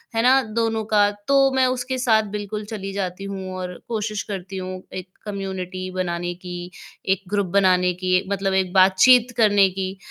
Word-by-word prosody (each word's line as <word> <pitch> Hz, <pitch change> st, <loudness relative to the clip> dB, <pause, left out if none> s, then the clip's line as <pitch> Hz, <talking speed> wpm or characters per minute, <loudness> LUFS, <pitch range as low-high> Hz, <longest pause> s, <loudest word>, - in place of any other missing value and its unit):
है 225 Hz, -, +2 dB
ना? 260 Hz, +2 st, +5 dB
दोनों 225 Hz, 0 st, -1 dB
का, 205 Hz, -1 st, +3 dB
तो 270 Hz, +7 st, +2 dB
मैं 260 Hz, -1 st, +4 dB
उसके 255 Hz, +1 st, -2 dB
साथ 225 Hz, -4 st, +3 dB
बिल्कुल 210 Hz, 0 st, -5 dB
चली 205 Hz, -2 st, -6 dB
जाती 190 Hz, -1 st, -4 dB
हूँ 190 Hz, -1 st, -6 dB
और 180 Hz, -1 st, -5 dB
कोशिश 215 Hz, -2 st, -3 dB
करती 195 Hz, -1 st, -6 dB
हूँ 185 Hz, 0 st, -5 dB
एक 185 Hz, 0 st, -6 dB, 0.2 s
कम्युनिटी 190 Hz, -2 st, -5 dB
बनाने 175 Hz, -1 st, -2 dB
की, 180 Hz, 0 st, -8 dB, 0.3 s
एक 190 Hz, 0 st, 0 dB
ग्रुप 200 Hz, -1 st, 0 dB
बनाने 180 Hz, -2 st, +3 dB
की 185 Hz, +1 st, +1 dB
मतलब 195 Hz, -1 st, 0 dB
एक 190 Hz, -1 st, +1 dB
बातचीत 200 Hz, +7 st, +5 dB
करने 205 Hz, -4 st, +5 dB
की। 190 Hz, +1 st, -4 dB
195 Hz, 170 wpm, -22 LUFS, 185-220 Hz, 0.3 s, ना